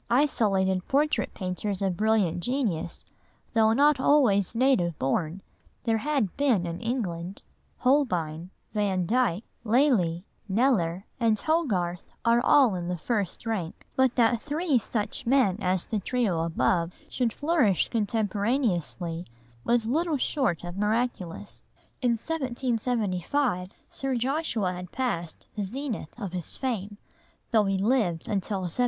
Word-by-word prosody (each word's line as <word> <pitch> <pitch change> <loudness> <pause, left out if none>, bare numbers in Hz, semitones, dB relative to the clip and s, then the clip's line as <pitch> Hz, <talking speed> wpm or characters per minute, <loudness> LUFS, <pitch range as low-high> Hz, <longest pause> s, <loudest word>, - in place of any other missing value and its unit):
Isolated 195 -8 +2
portrait 295 +3 +1
painters 190 +1 -3
of 190 -2 0
brilliant 210 -4 +2
genius, 225 - -2 0.5
though 220 -1 +4
not 285 +4 +4
always 235 -9 +3
native 225 - +2
born, 160 +7 -1 0.4
there 225 -1 +1
had 275 -8 0
been 255 -11 +2
in 170 0 -5
England,—Holbein, 185 - -2 0.2
Vandyke, 205 +1 +1 0.2
Lely, 215 - +2 0.2
Kneller, 195 -5 +1
and 225 -2 +3
Hogarth 200 - 0 0.2
are 235 +1 +4
all 260 -6 +5
in 175 -2 -3
the 180 0 -2
first 205 +3 -2
rank,—but 225 +5 -1
that 230 -1 +3
three 300 -2 +1
such 215 0 -4
men 245 -8 +3
as 185 -1 +1
the 215 - -2
trio 200 -5 0
above 170 +1 +1
should 245 -3 0
flourish 290 - +2
contemporaneously 205 - -1 0.4
was 235 -1 +2
little 310 +6 +1
short 260 - 0
of 175 +1 -6
miraculous. 210 -4 -2 0.4
In 245 -2 +3
1775, 240 - -1 0.2
Sir 270 -1 -2
Joshua 240 - 0
had 180 0 -8
passed 175 -11 -3
the 210 - -2
zenith 240 - -5
of 195 -5 -5
his 180 -3 -4
fame, 210 -6 -3 0.5
though 220 -3 +4
he 195 0 +1
lived 200 -6 +1
until 200 -1 -1
1792. 180 -2 -3
215 Hz, 125 wpm, -27 LUFS, 180-255 Hz, 0.5 s, all